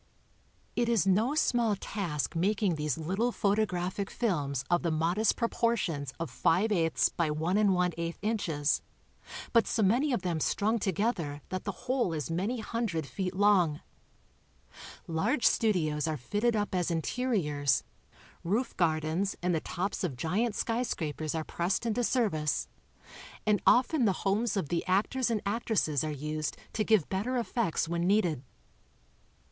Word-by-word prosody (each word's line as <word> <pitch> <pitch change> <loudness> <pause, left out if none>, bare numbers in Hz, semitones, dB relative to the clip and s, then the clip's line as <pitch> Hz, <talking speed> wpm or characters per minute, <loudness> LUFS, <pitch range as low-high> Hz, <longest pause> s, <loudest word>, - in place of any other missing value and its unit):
It 240 -1 +1
is 225 -6 +3
no 215 +9 +2
small 235 -7 +2
task 175 -7 -3
making 195 +2 +1
these 150 -3 -2
little 195 +10 0
photographic 200 -3 0
films 145 - -1
of 175 0 +2
the 170 - 0
modest 170 +7 +1
proportions 230 - 0
of 165 - -4
five 205 +7 +2
eighths 165 -5 +2
by 170 -2 -1
one 160 +5 0
and 205 -2 +4
one 180 0 +2
eighth 170 0 -3
incfies, 185 -9 0 0.7
but 230 -2 +4
so 225 - +1
many 245 +9 +3
of 235 -7 -1
them 170 -3 -1
strung 215 +8 +1
together 185 - -1
that 185 0 -4
the 200 - -1
whole 250 -8 +1
is 150 -2 -3
many 205 +8 -1
hundred 215 -9 -2
feet 185 +5 -4
long. 185 -7 +3 1.2
Large 210 - 0
studios 160 -9 +2
are 155 -1 -1
fitted 210 - 0
up 205 -2 -1
as 180 -2 0
interiors, 160 - 0 0.6
roof 220 +8 -1
gardens 160 +3 0
and 180 0 +2
the 160 - 0
tops 195 +4 -3
of 150 -9 -2
giant 205 - 0
skj 235 +1 0
scrapers 155 -7 -3
are 160 - -1
pressed 175 +8 -1
into 235 +2 0
service 195 - 0 0.8
and 210 -2 +2
often 255 +1 +4
the 195 - +3
homees 210 +3 +1
of 160 -7 -2
the 170 - 0
actors 220 +7 +1
and 220 -3 0
actresses 200 - 0
are 155 - -2
used 150 +1 -3 0.2
to 215 - 0
give 215 -8 +3
better 220 +7 -1
effects 230 -8 -1
when 170 +1 -1
needed. 180 -9 +2
190 Hz, 150 wpm, -30 LUFS, 160-220 Hz, 1.2 s, and